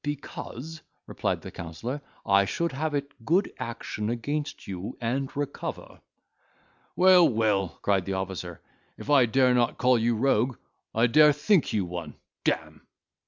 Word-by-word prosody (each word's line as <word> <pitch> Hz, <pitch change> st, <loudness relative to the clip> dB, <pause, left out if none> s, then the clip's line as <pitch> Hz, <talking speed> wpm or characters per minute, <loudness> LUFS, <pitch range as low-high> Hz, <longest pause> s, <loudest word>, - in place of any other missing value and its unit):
"Because," 145 Hz, +1 st, -6 dB, 0.2 s
replied -, -, -2 dB
the -, -, -8 dB
counsellor, 115 Hz, -, -6 dB, 0.2 s
"I 100 Hz, -1 st, +4 dB
should 170 Hz, +11 st, -1 dB
have 150 Hz, +3 st, -2 dB
it 140 Hz, -4 st, -5 dB
good 175 Hz, -, +1 dB
action 115 Hz, -3 st, -4 dB
against 145 Hz, +6 st, -3 dB
you, 95 Hz, +1 st, -6 dB
and 130 Hz, +3 st, -1 dB
recover." 145 Hz, -1 st, -5 dB, 0.9 s
"Well, 180 Hz, -2 st, +6 dB
well," 105 Hz, -5 st, 0 dB
cried 100 Hz, -3 st, +2 dB
the 95 Hz, -, -2 dB
officer, 95 Hz, -2 st, -5 dB, 0.4 s
"if 145 Hz, -, -5 dB
I 135 Hz, -4 st, +6 dB
dare 130 Hz, +2 st, +3 dB
not 120 Hz, -1 st, +1 dB
call 125 Hz, -1 st, +3 dB
you 115 Hz, +1 st, +1 dB
rogue, 125 Hz, 0 st, +1 dB, 0.4 s
I 115 Hz, +2 st, +4 dB
dare 150 Hz, +5 st, +6 dB
think 155 Hz, +3 st, +2 dB
you 100 Hz, -4 st, 0 dB
one, 85 Hz, -3 st, -6 dB, 0.3 s
d—me!" -, -, -1 dB
120 Hz, 145 wpm, -27 LUFS, 100-145 Hz, 0.9 s, Well